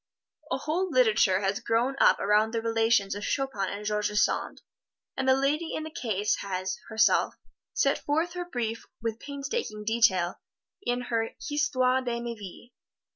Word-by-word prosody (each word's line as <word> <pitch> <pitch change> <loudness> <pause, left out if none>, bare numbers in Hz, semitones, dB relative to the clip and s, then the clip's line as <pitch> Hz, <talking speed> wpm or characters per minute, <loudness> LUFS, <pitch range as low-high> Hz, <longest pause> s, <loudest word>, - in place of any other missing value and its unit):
A - - +1
whole 355 +5 -1
literature 220 - +4
has 195 0 0
grown 235 +4 +1
up - - +6
around 215 +3 +2
the 225 - 0
relations 225 -3 +2
of 205 +1 -6
Chopin 265 -9 -1
and 205 +1 -6
George 210 0 0
Sand, 210 0 0 0.5
and 265 0 0
the 260 - +6
lady 295 +5 0
in 310 - -3
the 315 - -7
case 215 - -1
has, 185 -1 -3
herself, 220 -1 +3 0.4
set - - +2
forth 320 +4 0
her 355 0 -4
brief 230 -8 -4 0.2
with 225 -1 -2
painstaking 280 - -4
detail 210 -6 +2 0.4
in 245 -9 -1
her 230 -2 -2
"Histoire 260 -3 +2
de 240 -2 -2
Ma 235 0 -4
Vie." 210 +3 -11
230 Hz, 160 wpm, -28 LUFS, 210-270 Hz, 0.5 s, up